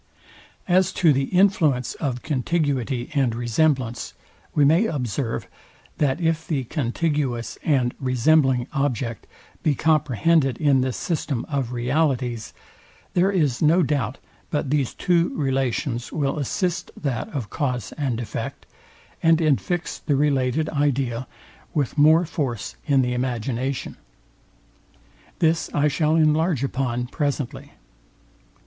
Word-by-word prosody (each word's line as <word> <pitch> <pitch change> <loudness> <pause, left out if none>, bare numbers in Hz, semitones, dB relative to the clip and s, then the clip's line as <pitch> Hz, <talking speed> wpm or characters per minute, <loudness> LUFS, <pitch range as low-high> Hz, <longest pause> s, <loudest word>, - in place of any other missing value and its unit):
As 185 0 +3
to 165 -4 +4
the 135 0 +1
influence 170 -8 +2
of 130 -5 -3
contiguity 140 -3 -1
and 130 -6 +1
resemblance, 120 0 0 0.4
we 145 - +5
may 165 +10 +4
observe, 125 - -2 0.5
that 145 0 +1
if 165 -1 0
the 140 -5 -1
contiguous 135 -2 -2
and 130 -5 +2
resembling 130 0 +3
object 125 -6 -2 0.3
be 150 -3 +2
comprehended 150 -2 +2
in 140 -4 +3
this 130 -1 -1
system 150 -7 -2
of 135 -5 -2
realities, 125 -2 0 0.6
there 185 +2 +3
is 150 -11 +1
no 165 +4 +4
doubt 140 -5 -1 0.3
but 145 -2 -2
these 145 -4 0
two 175 -1 +1
relations 135 -3 -1
will 145 -1 -1
assist 175 +5 -1
that 130 -6 -2
of 125 -9 -5
cause 125 - -2
and 130 -6 -2
effect, 120 - -5 0.6
and 165 0 +5
infix 165 +2 -1
the 145 - +1
related 140 +1 +1
idea 135 -4 0 0.5
with 145 -5 0
more 155 +4 +5
force 125 -10 -3
in 135 -3 +4
the 125 0 -1
imagination. 125 +1 -2 1.4
This 160 0 +1
I 145 +1 +3
shall 155 +2 +1
enlarge 155 -2 +2
upon 125 -3 -1
presently. 140 -1 -3
140 Hz, 120 wpm, -23 LUFS, 125-155 Hz, 1.4 s, we